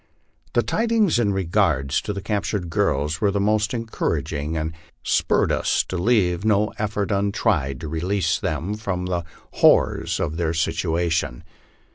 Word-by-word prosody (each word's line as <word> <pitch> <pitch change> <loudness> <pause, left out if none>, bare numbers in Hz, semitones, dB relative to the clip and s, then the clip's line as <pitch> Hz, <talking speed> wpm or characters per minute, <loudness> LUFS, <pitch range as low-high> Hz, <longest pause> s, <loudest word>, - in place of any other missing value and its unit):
The - - +3
tidings 225 - +2
in 105 -4 +2
regard 85 -8 +1
to 90 - 0
the 100 -1 -5
captured 100 -4 -2
girls 80 -5 0
were 100 - +3
most 105 +2 +1
encouraging, 80 - -2
and 80 +1 -2 0.3
spur - - +2
red - - +1
us - - +1
to - - -3
leave 90 -2 +2
no 105 -1 +2
effort 105 -1 -1
untried 100 - 0
to 80 - -5
release 85 +3 0
them 80 +7 -2
from 100 -4 -3
the 90 -1 -2 0.4
horrors - - +4
of 80 - -2
their 85 -1 -1
sit 80 0 0
uation. 80 -5 -1
90 Hz, 150 wpm, -23 LUFS, 80-105 Hz, 0.4 s, horrors